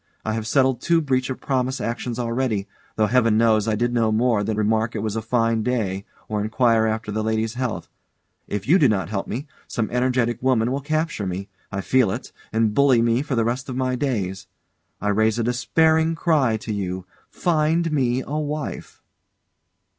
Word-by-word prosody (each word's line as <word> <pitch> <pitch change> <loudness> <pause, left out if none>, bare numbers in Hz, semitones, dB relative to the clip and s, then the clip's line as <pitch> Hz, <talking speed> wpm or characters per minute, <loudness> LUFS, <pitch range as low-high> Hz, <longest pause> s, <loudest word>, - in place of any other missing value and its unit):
I 110 - -1
have 110 -1 -3
settled 130 0 +2
two 170 -1 +3
breach 130 -4 0
of 130 - -4
promise 130 0 -1
actions 120 0 -3
already, 115 -4 -1 0.3
though 110 - +3
Heaven 115 -1 +3
knows 110 -2 +3
I 110 - +2
did 120 +3 0
no 115 -2 +2
more 110 -1 +2
than 110 +1 -2
remark 110 +2 +1
it 110 - -2
was 110 -1 -2
a 110 - -1
fine 115 0 +1
day, 105 -5 -1 0.2
or 105 -1 -1
enquire 110 +1 +2
after 110 -1 -2
the 110 +1 -1
lady's 110 0 0
health. 125 -2 -3 0.6
If 105 +1 -4
you 175 +7 +5
do 140 - +5
not 95 -5 0
help 95 -2 -3
me, 130 +7 -4 0.2
some 115 -3 -2
energetic 125 -1 +1
woman 125 -2 +2
will 140 +2 -2
capture 155 - -1
me 95 +2 -4 0.2
I 100 0 -2
feel 125 +1 +3
it - - -5 0.2
and 110 -1 +1
bully 130 -2 +4
me 115 +2 +2
for 145 -2 -2
the 115 -1 +2
rest 125 +3 -2
of 130 - -4
my 130 -1 0
days. 105 -9 -2 0.5
I 105 - -1
raise 110 +2 +2
a 120 - 0
despairing 160 +7 +2
cry 145 -9 +2
to 110 0 -5
you 95 -2 -3 0.2
Find 165 0 +1
me 130 -3 +1
a 150 +2 -2
wife! 150 -2 -5
115 Hz, 190 wpm, -23 LUFS, 110-130 Hz, 0.6 s, you